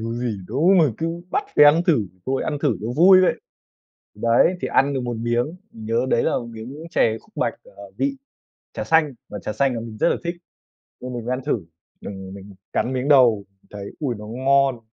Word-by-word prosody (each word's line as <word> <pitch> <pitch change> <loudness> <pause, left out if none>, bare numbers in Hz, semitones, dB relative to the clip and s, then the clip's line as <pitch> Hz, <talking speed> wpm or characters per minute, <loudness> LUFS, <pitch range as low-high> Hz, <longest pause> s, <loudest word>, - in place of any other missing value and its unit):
Có 115 - -3
gì 120 -3 -3
đâu 150 - +2
mà 165 - +6
cứ 165 - -1 0.2
bắt 410 - 0
phải - - +8
ăn 155 +4 +6
thử, 135 - +3 0.2
thôi 135 0 0
ăn 150 -2 -2
thử 135 -8 +2
cho 110 - -5
vui 185 +3 +7
vậy!" 185 - +3 0.8
Thì 105 - -17
đấy, 115 +10 +4
thì - - -2
ăn 140 +1 +2
được 130 - -1
một 120 -1 -3
miếng, 120 +7 -1 0.2
nhớ 115 +3 -2
đấy 120 - +2
là - - +1
một 120 - -7
miếng 130 +8 -9
chè 110 -6 +2
khúc 215 - -26
bạch, - - 0
à, - - -15
vị 275 0 -1 0.6
trà - - -4
xanh, 160 -4 +2
mà 105 - -7
trà - - -3
xanh 130 +4 +1
là 115 - -3
mình 115 -1 -8
rất - - +3
là - - +1
thích, 170 +1 -2 0.7
nên 125 0 -6
mình 120 -2 -5
mới 125 - -1
ăn 130 - -2
thử. 110 - -1 0.4
Đừng 95 -1 -8
mình 100 0 -11 0.2
cắn 130 - 0
miếng 130 +1 -2
đầu 120 -8 +5 0.2
thấy 100 -1 -8
ôi, 130 -6 -2
nó 105 - -9
ngon, 135 +1 +2
125 Hz, 225 wpm, -22 LUFS, 115-150 Hz, 0.8 s, phải